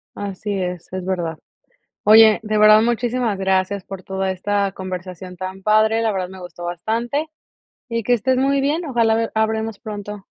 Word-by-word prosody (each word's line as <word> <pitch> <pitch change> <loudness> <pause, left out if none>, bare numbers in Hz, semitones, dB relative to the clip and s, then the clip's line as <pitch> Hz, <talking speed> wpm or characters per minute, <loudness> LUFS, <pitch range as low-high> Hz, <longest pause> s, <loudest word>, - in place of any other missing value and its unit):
Así 205 +1 -5
es, 180 -1 -5
es 185 -1 -4
verdad. 175 -4 -2 0.7
Oye, 220 0 +7
de 215 -1 -1
verdad 215 0 +7
muchísimas 240 -2 0
gracias 190 0 0
por 195 -1 -8
toda 190 0 -2
esta 200 +1 -1
conversación 185 -1 -7
tan 190 +1 -7
padre, 215 +2 +3
la 225 -2 +1
verdad 185 -2 -2
me 190 0 -11
gustó 175 -1 -9
bastante, 230 - -2 0.6
y 230 -1 -2
que 245 - +2
estés 255 +3 +1
muy 275 +1 +2
bien, 310 +5 0
ojalá 230 -5 +2
ve, 225 0 -1
hablemos 220 -1 -1
pronto. 205 -2 -7
205 Hz, 170 wpm, -20 LUFS, 185-225 Hz, 0.7 s, Oye